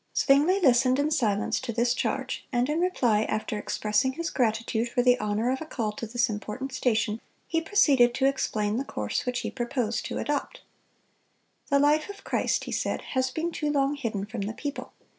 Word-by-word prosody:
(248) 275 - +5 0.2
Zwingle 380 -7 +3
listened 255 +1 +4
in 290 +2 +1
silence 215 -8 +1
to 260 -2 -4
this 235 +1 +1
charge, - - -2
and 245 +1 +1
in 305 +2 0
reply, 250 -12 +2
after 215 0 -2
expressing 210 +5 0
his 335 +3 -3
gratitude 230 -1 0
for 245 +1 +1
the 250 0 +5
honor 210 +3 0
of 265 - -2
a - - -4
call 225 -8 -2
to 220 +2 -6
this 235 +2 +1
important 220 +5 -5
station, 225 -3 0 0.3
he 330 0 0
proceeded 285 -10 +4
to 265 - +1
explain 215 -6 0
the 265 - -1
course 105 - -3
which 250 0 -1
he - - -4
proposed, 240 -2 -2
to - - -4
adopt. 290 -1 -3 1.1
"The 280 - +4
life 300 +4 +3
of 400 0 -9
Christ," - - 0
he - - -6
said, - - -2
"has 260 -1 +1
been 330 +4 -2
too 300 -2 -2
long 280 -1 +2
hidden 225 -8 -3
from 220 0 -6
the 205 +2 -3
people. 285 +4 -6
250 Hz, 200 wpm, -27 LUFS, 220-280 Hz, 1.1 s, 248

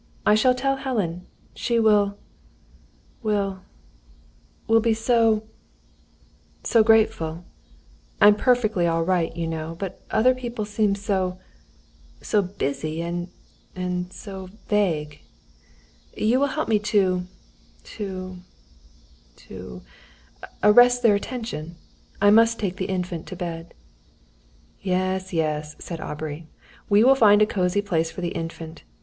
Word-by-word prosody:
I - - +5
shall 250 +4 +4
tell 270 +2 0
Helen. 200 -10 -3 0.3
She 235 -1 -1
will 205 -2 +3 1.0
will 200 -4 -1 1.0
will 225 0 +4
be 225 0 +1
so 225 -1 +2 1.2
so 230 - +4
grateful. 215 -7 +2 0.7
I'm 205 0 +8
perfectly 220 -6 +2
all 165 0 +1
right, 175 -2 +1
you 170 - -2
know; 160 0 -4
but 195 0 -6
other 245 +4 +4
people 240 -4 -5
seem 210 -1 +1
so 190 -3 -1 0.8
so 210 - +1
busy, 155 -3 -3
and 175 +1 -4 0.5
and 180 0 -3
so 190 -2 -9 0.2
vague. 160 -8 0 1.0
You 230 +4 +2
will 285 - +2
help 305 +3 -3
me 215 -2 +3
to 190 -4 +1 0.7
to 185 -2 -5 1.0
to 65 - -10 0.8
arrest 245 +3 +6
their 225 -3 +6
attention. 200 -7 -4 0.4
I 205 +1 +5
must 230 +1 +5
take 195 -3 -3
the 190 - -2
Infant 180 -3 -3
to 185 - -7
bed." 170 -1 -6 1.1
"Yes, 185 0 -1
yes," 155 -2 -2
said 165 -2 -7
Aubrey; 155 +1 -6 0.4
"we 205 +1 +5
will 265 +2 +7
find 215 -5 +5
a - - +5
cosy 190 -1 0
place 165 -5 0
for 180 - -8
the 175 - -1
Infant. 165 -1 -7
195 Hz, 120 wpm, -24 LUFS, 170-220 Hz, 1.2 s, I'm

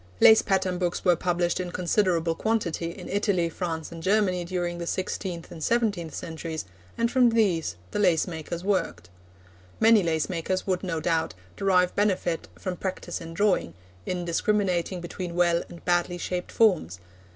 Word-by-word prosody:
Lace 220 - +8
pattern 190 -2 0
books 180 +1 -2
were 175 -2 +5
published 175 +1 0
in 180 -1 -3
considerable 175 -2 +1
quantity 175 -4 -1
in 180 +1 -9
Italy, 200 -4 +1
France 165 -2 -4
and 165 -1 -8
Germany 190 -1 +2
during 175 -1 -3
the 170 - -4
sixteenth 185 -2 -3
and 160 -2 -7
seventeenth 205 -9 0
centuries, 160 - -5 0.3
and 235 0 +1
from 255 -2 +5
these 185 - +1 0.2
the - - -2
lace 180 -6 +3
makers 170 0 -5
worked. 90 - -1 0.7
Many 225 -1 +6
lace 160 -3 0
makers 185 +1 -2
would, 185 -2 0
no 175 -4 -2
doubt, 165 - 0 0.2
derive 180 - +2
benefit 190 -5 0
from 185 -2 -4
practice 185 -2 -4
in 165 0 -8
drawing, 200 - +1 0.3
in 180 -1 -2
discriminating 180 0 0
between 175 0 -6
well 175 -1 +3
and 170 - -12
badly 175 0 +1
shaped 180 +1 -4
forms. 170 - +2
180 Hz, 160 wpm, -26 LUFS, 170-195 Hz, 0.7 s, Lace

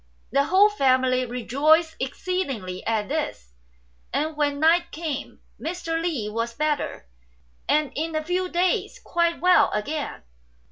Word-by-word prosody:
The 275 +3 +3
whole 390 +6 +5
family 255 -6 +2
rejoiced 295 +7 +2
exceedingly 260 - -3
at 220 -2 0
this, 275 - -4 0.6
and, 300 +4 -1
when 290 -1 0
night 335 +2 +4
came, 310 -3 -5 0.2
Mr. 330 -1 -3
Li 305 -11 -2
was 230 +2 -3
better, 300 - -2 0.6
and 300 -1 +2
in 320 +2 -3
a 310 - 0
few 360 +3 -1
days 360 +7 0
quite 340 0 0
well 360 +1 +5
again. 290 +8 -3
305 Hz, 130 wpm, -24 LUFS, 255-335 Hz, 0.6 s, whole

